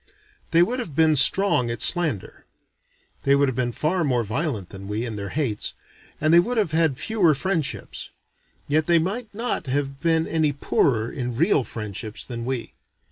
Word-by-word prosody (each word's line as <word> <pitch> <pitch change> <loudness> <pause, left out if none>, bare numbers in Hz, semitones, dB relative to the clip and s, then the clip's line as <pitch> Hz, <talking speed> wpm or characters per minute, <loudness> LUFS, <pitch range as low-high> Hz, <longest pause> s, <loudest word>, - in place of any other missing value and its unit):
They 170 +1 +5
would 245 +8 -2
have 170 - -6
been 160 0 +4
strong 150 -4 +5
at 115 -1 -3
slander. 160 - 0 0.7
They 140 0 +3
would 140 0 +3
have 130 - -2
been 125 -1 -1
far 165 +8 0
more 125 -5 +1
violent 115 - -3
than 95 0 -9
we, 105 +3 -2
in 115 -3 -5
their 100 -1 -5
hates, 135 -9 -2 0.4
and 155 +1 +2
they 170 - +8
would 240 +7 0
have 205 -8 +1
had 160 -4 +2
fewer 190 -7 +2
friendships. 165 0 -3 0.6
Yet 155 +2 +1
they 170 -1 +5
might 205 +8 -2
not 225 - -3
have 135 +1 -2
been 160 +1 +1
any 155 -3 0
poorer 120 -4 +1
in 125 -3 -4
real 145 0 +2
friendships 110 -1 -6
than 115 -2 -6
we. 130 -2 -4
145 Hz, 180 wpm, -23 LUFS, 120-170 Hz, 0.7 s, they